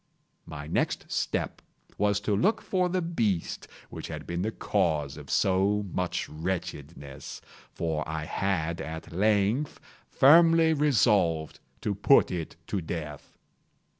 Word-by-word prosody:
My 75 -2 -7
next 80 - -1
step - - -2 0.3
was 105 -1 +1
to 105 0 0
look 210 - +2
for 185 -3 0
the 185 0 0
beast 110 - -1 0.2
which - - -7
had - - -7
been 85 0 -3
the 105 - 0
cause 80 -10 0
of - - -11
so 100 +2 +2
much 90 -1 -2
wretchedness; 75 -4 -6 0.3
for 80 -2 -2
I 80 -1 -3
had, 85 -2 -1
at 80 0 -7
length, 105 - +1 0.3
firmly 165 +3 +6
resolved 100 - +2 0.2
to 105 - -1
put 105 +8 +4
it 85 -3 -4
to 100 +1 -2
death. 75 -3 -7
95 Hz, 130 wpm, -28 LUFS, 80-110 Hz, 0.3 s, firmly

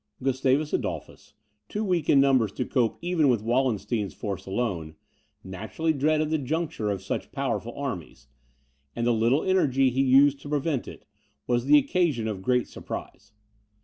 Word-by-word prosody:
Gustavus 135 +3 +1
Adolphus, - - -4 0.3
too 210 - -2
weak 175 -6 0
in 140 - +6
numbers 130 -6 +3
to 125 - -2
cope 120 -5 0
even 170 -5 +2
with 115 -4 +1
Wallenstein's 115 -4 0
force 100 -3 -5
alone, 95 -7 -3 0.5
naturally 110 - -2
dreaded 155 +2 +1
the 160 - +1
junction 150 -5 -2
of 95 -2 -3
such - - -4
powerful - - -3
armies, 65 - -6 0.7
and 115 - -1
the 120 - +3
little 115 +6 +2
energy 135 -9 +2
he 130 +2 +1
used 135 +1 +5
to 145 - -10
prevent 145 -2 -1
it, - - -11 0.4
was 120 0 0
the 145 +2 +7
occasion 145 -6 +1
of 105 -4 -4
great 125 +3 +1
surprise. 105 0 -8
130 Hz, 155 wpm, -26 LUFS, 110-150 Hz, 0.7 s, the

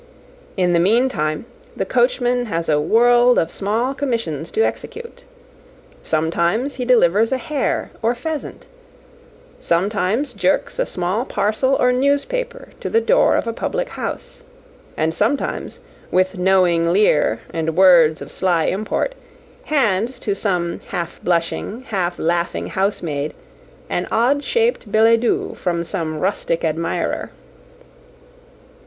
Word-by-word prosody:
In 180 -2 +2
the 170 - +4
meantime, 190 -5 +1 0.3
the - - -1
coachman 245 0 +1
has 165 -6 -3
a 150 -1 +2
world 240 +7 +4
of 165 - +1
small 225 +6 -1
commissions 230 - -3
to 445 - +1
execute. 480 +1 -6 0.8
Sometimes 170 - 0
he 250 - -2
delivers 225 -2 +3
a 265 - +1
hare 280 +3 -2
or 230 +2 +1
pheasant; 305 +4 -5 0.9
sometimes 200 +8 0
jerks - - 0
a - - +1
small 185 +6 -2
parcel 260 +3 0
or 250 -1 +3
newspaper 475 - -1
to - - -4
the 455 - +3
door - - +3
of - - 0
a 230 - -2
public - - -3
house; - - -6 0.6
and 160 +1 0
sometimes, 225 +10 -2 0.3
with 185 +1 +1
knowing 180 -2 +3
leer 150 - +2
and 160 -1 -2
words 170 -5 +5
of - - -11
sly 175 -3 +1
import, 215 - -1 0.5
hands 240 -4 +1
to 205 - -1
some 180 -4 -2
half 170 -1 -5
blushing, 175 +7 -1
half 180 -4 -1
laughing 170 +1 -1
housemaid 165 -7 -2 0.5
an - - -2
odd 270 +6 +2
shaped 460 - 0
billet 225 +1 +5
doux 240 - 0
from 170 -2 -1
some 165 -4 -4
rustic 165 -2 -1
admirer. 165 +1 -2
205 Hz, 125 wpm, -20 LUFS, 170-250 Hz, 0.9 s, words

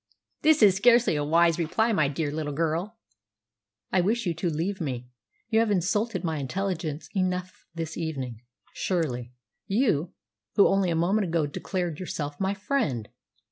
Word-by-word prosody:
This 310 -3 +5
is 195 -3 +7
scarcely 235 -2 +5
a 145 - 0
wise 165 +2 +3
reply, 220 +8 +1
my 155 -7 +3
dear 145 +1 -2
little 150 -1 -3
girl!" 165 +8 -1 0.9
"I 185 - +3
wish 220 +5 0
you 175 - +1
to 170 +2 -2
leave 175 +5 -2
me. 125 -5 -4 0.4
You 220 -1 +3
have 225 -1 +2
insulted 205 +1 0
my 160 -2 -1
intelligence 160 +1 -3
enough 185 -1 -2
this 165 -1 -4
evening, 135 -9 -4 0.3
surely 125 -10 -2 0.4
you, 195 - +1 0.4
who 200 - +7
only 195 -2 +2
a 165 - +1
moment 190 +5 +2
ago 165 -2 +1
declared 170 +2 -3
yourself 145 -5 -4
my 195 +1 0
friend!" 200 - -1
170 Hz, 155 wpm, -27 LUFS, 155-195 Hz, 0.9 s, is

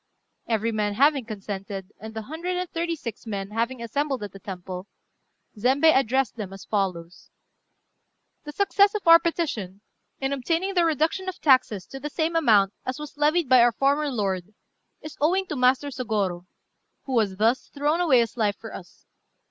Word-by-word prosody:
Every 225 0 0
man 210 -2 -1
having 275 +1 +3
consented, 195 -2 -6
and 220 0 -9
the 220 - -4
hundred 335 +8 -4
and 365 0 -2
thirty 335 0 -2
six 235 -6 -8
men 200 -2 -4
having 235 +2 -2
assembled 270 +1 -2
at 205 - -6
the 195 - -12
temple, 185 0 -7 0.7
Zembei 270 +8 +4
addressed 265 -2 +1
them 205 -4 -5
as 195 - -11
follows: 180 -5 -3 1.1
"The 295 - -7
success 400 +3 +3
of 405 -4 -4
our 335 0 +10
petition, 285 - -3 0.4
in 270 +1 -1
obtaining 330 +8 -1
the 350 -2 +3
reduction 325 +4 0
of 370 - -6
our - - -40
taxes 255 -9 +3
to 270 - -9
the 295 +2 -5
same 325 +2 -1
amount 210 -11 +4
as 255 - -4
was 300 -1 -8
levied 300 +2 +2
by 255 -1 +6
our 240 0 +5
former 285 +4 +1
lord, 200 -5 -3 0.5
is 310 - -9
owing 370 +6 +2
to 305 - -5
Master 255 +2 +2
Sôgorô, 205 -9 -2 0.6
who 260 -4 +1
has 200 -4 0
thus 230 +5 +1
thrown 295 +4 0
away 275 -9 +5
his 230 -1 -3
life 210 -4 0
for 225 - -10
us. 180 - -12
255 Hz, 180 wpm, -25 LUFS, 205-305 Hz, 1.1 s, our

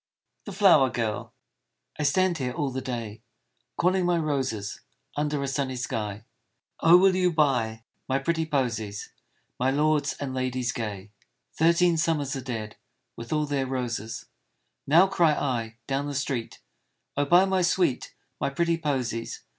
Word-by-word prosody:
THE 205 - -6
FLOWER 175 -9 +5
GIRL 110 -4 -3 0.7
I - - 0
STAND 175 +4 +2
here 125 -2 -2
all 145 -4 -2
the 130 +1 -3
day, 115 -4 -5 0.6
Calling 185 +2 +2
my 175 -1 +2
roses, 135 -10 -2 0.3
Under 150 -1 -1
a - - -2
sunny 135 -1 -2
sky, 110 -4 -4 0.3
" - - -55
Oh! 165 +2 +8
will 190 0 +4
you 180 -1 +2
buy 120 -8 +1 0.3
My 130 - +2
pretty 160 +3 -1
posies 115 -8 -2 0.5
My 130 +2 +2
lords 150 +1 +2
and 135 -2 -5
ladies 130 -1 -1
gay? 105 -4 -5 0.2
" - - -52
Thirteen 170 +1 +4
summers 150 -4 0
are 135 - -4
dead 115 -4 -5 0.4
With 115 0 -9
all 150 -1 +1
their 140 -2 -1
roses, 115 -4 -4 0.6
Now 165 +6 +7
cry 170 -5 +3
I 115 -6 -2
down 140 +1 -1
the 145 - -4
street, 130 -4 -3 0.3
" - - -52
Oh! 145 - +1
buy 175 +6 +6
my 190 -1 +1
sweet 175 -6 +1 0.2
My - - 0
pretty 170 +4 0
posies! 130 -7 -3
140 Hz, 160 wpm, -26 LUFS, 120-165 Hz, 0.7 s, Oh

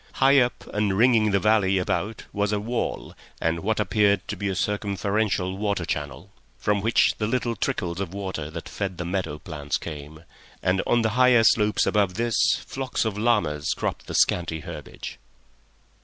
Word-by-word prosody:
High 135 +1 +5
up 125 -1 0
and 105 -2 +1
ringing 115 -2 +4
the 100 - +3
valley 100 -2 +3
about 100 +4 -2
was 100 0 0
a 105 - 0
wall, 115 +3 -3 0.3
and 80 +1 0
what 110 +6 -1
appeared 100 -1 +2
to - - -2
be 100 -1 -2
a 95 - -2
circumferential 100 -1 -1
water 100 -4 -1
channel, 70 -5 -5 0.3
from 105 -1 0
which 115 +3 +3
the 105 - 0
little 120 0 -1
trickles 90 -3 -2
of 95 -3 -3
water 95 -6 -4
that 80 +1 -7
fed 95 -3 -4
the 90 - -4
meadow 85 -4 -2
plants 75 -1 -4
came, 75 0 -8 0.4
and 95 +1 +2
on 120 -1 +3
the 110 - +2
higher 125 0 +5
slopes 105 -1 +3
above 100 -4 +1
this 115 0 0 0.3
flocks 130 -3 -2
of 110 -3 -1
llamas 105 -10 +1
cropped - - -3
the - - -5
scanty 80 -2 +2
herbage. - - -8
100 Hz, 170 wpm, -25 LUFS, 90-110 Hz, 0.4 s, High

